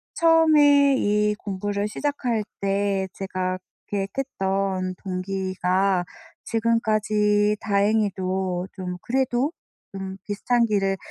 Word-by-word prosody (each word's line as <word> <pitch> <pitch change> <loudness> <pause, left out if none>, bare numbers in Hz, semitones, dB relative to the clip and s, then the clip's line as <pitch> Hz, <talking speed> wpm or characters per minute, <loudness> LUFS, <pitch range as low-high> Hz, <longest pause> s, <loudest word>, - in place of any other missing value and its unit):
처음에 300 -4 +5
이 210 -1 +2
공부를 200 +1 -2
시작할 245 -2 -1 0.2
때 195 -1 0
제가 185 -1 -3 0.3
계획했던 195 -4 -2
동기가 185 0 0 0.4
지금까지 215 -2 +2
다행히도 190 -3 0
좀 180 -2 -5
그래도 260 +2 0 0.4
좀 190 0 -6
비슷한 235 +4 +1
길을 195 -3 +1
205 Hz, 205 characters per minute, -24 LUFS, 190-230 Hz, 0.4 s, 처음에